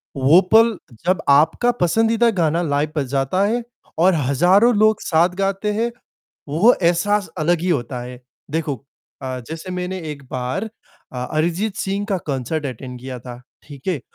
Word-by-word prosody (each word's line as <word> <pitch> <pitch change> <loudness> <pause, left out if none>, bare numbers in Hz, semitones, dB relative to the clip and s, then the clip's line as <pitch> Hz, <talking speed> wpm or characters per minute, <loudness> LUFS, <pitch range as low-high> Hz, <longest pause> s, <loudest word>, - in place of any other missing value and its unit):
वो 140 +6 +6
पल 225 -1 +6 0.3
जब 185 +1 +2
आपका 160 +12 +4
पसंदीदा 225 +6 +3
गाना 165 +1 +1
लाइव 145 -1 0
बज 145 -3 0
जाता 140 +7 +1
है 235 +3 0 0.4
और 185 +3 +5
हजारों 175 - +4
लोग 215 0 +3
साथ 170 +1 +3
गाते 195 +2 -1
हैं, 230 +3 -1 0.6
वो 175 - +4
एहसास 185 +4 +2
अलग 165 +2 +1
ही 180 - -2
होता 125 -6 -1
है। 125 0 -9 0.3
देखो 155 -2 -2 0.5
अ, 130 -1 -4
जैसे 165 +3 -7
मैंने 180 +1 -4
एक 140 -1 -12
बार 130 - -3 0.4
अ 125 -1 -4
अरिजीत 175 +7 0
सिंह 195 +1 -2
का 200 -2 0
कॉन्सर्ट 140 +3 -2
अटेन्ड 125 -1 -7
किया 130 0 -7
था। 120 0 -10 0.2
ठीक 140 -3 -13
है, 175 -7 0
165 Hz, 160 wpm, -20 LUFS, 140-195 Hz, 0.6 s, वो